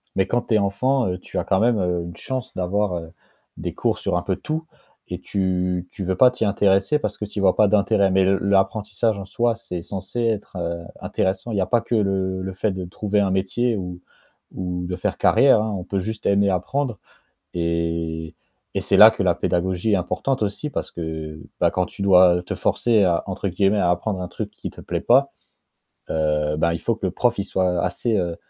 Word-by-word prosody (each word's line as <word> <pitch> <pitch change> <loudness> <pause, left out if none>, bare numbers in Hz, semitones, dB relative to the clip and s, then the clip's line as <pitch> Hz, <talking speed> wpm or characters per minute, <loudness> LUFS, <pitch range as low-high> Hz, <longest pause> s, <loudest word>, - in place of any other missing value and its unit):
Mais 95 -1 +2
quand 120 +4 0
tu 115 - 0
es - - +6
enfant, 120 +5 +1
heu, 90 0 -2
tu - - -8
as - - +1
quand 95 - +1
même, 115 0 +3
heu, 90 -2 0
une 85 0 -8
chance 130 +4 -5
d'avoir, 95 +1 0
heu, 80 -1 -6 0.5
des - - -4
cours - - -1
sur - - -1
un 90 - +1
peu 95 0 -2
tout 160 +1 -3 0.5
et - - -4
tu 90 -2 -1
tu 95 - -6
veux 95 0 0
pas 125 +5 +6
t'y 115 - -2
intéresser 100 +6 +2
parce - - -4
que 105 - -4
tu 105 0 -6
y - - -1
vois 95 -2 +4
pas 105 - +5
d'intérêt, 100 -1 +3
mais 95 0 +4
le 95 +1 +3
l'apprentissage 100 +2 +1
en 95 - -6
soi, 115 +3 0
c'est 90 -7 -6
censé 100 +4 -5
être, 110 -4 -1
heu, 85 0 -3 0.2
intéressant. 95 +5 -2
Il 105 - -1
y - - +2
a - - +1
pas 115 +4 +2
que 115 - -2
le 95 -2 0
le 95 0 -4
fait 100 +3 -1
de 95 -1 -5
trouver 105 +3 -1
un 95 -2 +1
métier 110 +5 0
ou 90 -2 -6 0.5
ou 90 -1 -3
de 90 - -3
faire - - -2
carrière, 135 -5 +5
hein, 110 -1 -2
on 90 - -5
peut 100 +1 -2
juste 110 +3 -5
aimer 100 0 +3
apprendre 115 +6 -1 0.6
et 85 -1 -2 0.4
et - - +2
c'est - - +2
là - - +11
que - - -2
la - - +3
pédagogie 95 +4 0
est - - +5
importante 110 +8 -1
aussi 105 +9 -2
parce - - -4
que, 80 -2 -6 0.2
bah, - - +4
quand 90 0 0
tu 100 - -8
dois 90 -2 +6
te - - -5
forcer 110 -4 +2
à, 85 -2 +2
entre 95 +1 -4
guillemets, 95 +3 +2
«à 90 - +2
apprendre» 90 +2 -1
un 90 - -3
truc - - -5
qui - - -7
te - - -13
plaît - - -3
pas, 135 +3 +4 0.8
heu, 75 -1 0
ben, 85 +1 +2
il 85 - -3
faut 115 - 0
que 105 - -5
le - - -2
prof, 120 +3 +1
il 100 - -1
soit 90 -2 0
assez, 105 +5 0
heu, 85 -2 -1
95 Hz, 225 wpm, -22 LUFS, 90-105 Hz, 0.8 s, là